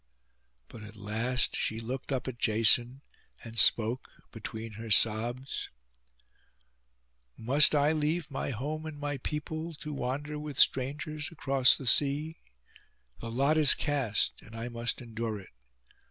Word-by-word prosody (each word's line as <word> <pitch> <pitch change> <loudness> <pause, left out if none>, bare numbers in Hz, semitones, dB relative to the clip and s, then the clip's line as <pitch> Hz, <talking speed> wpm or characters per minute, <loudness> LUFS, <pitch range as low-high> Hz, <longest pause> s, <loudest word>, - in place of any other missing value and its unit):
But 110 - -12
at 105 0 -11
last 110 +4 -1
she 110 - -1
looked 125 +5 -5
up 130 -2 -2
at 125 -2 -6
Jason, 120 +4 +3 0.4
and 115 -1 -10
spoke 115 +2 +3 0.2
between 110 0 -7
her 110 +2 -8
sobs— 115 +5 +1 1.7
'Must 140 +6 +4
I 145 +1 +3
leave 155 +1 -1
my 135 - -3
home 150 +6 -4
and 155 -2 -7
my 145 -1 -3
people, 155 +4 -5
to 150 +1 -7
wander 145 +3 -3
with 150 -3 -7
strangers 150 +3 +1
across 135 -5 +3
the 135 - -8
sea? 145 +5 +2 0.8
The 115 - -6
lot 140 +6 +2
is 150 -3 +7
cast, 140 -8 -1
and 115 - -14
I 115 +2 -5
must 120 +1 -3
endure 115 -2 -4
it. 95 - -14
130 Hz, 140 wpm, -30 LUFS, 115-150 Hz, 1.7 s, is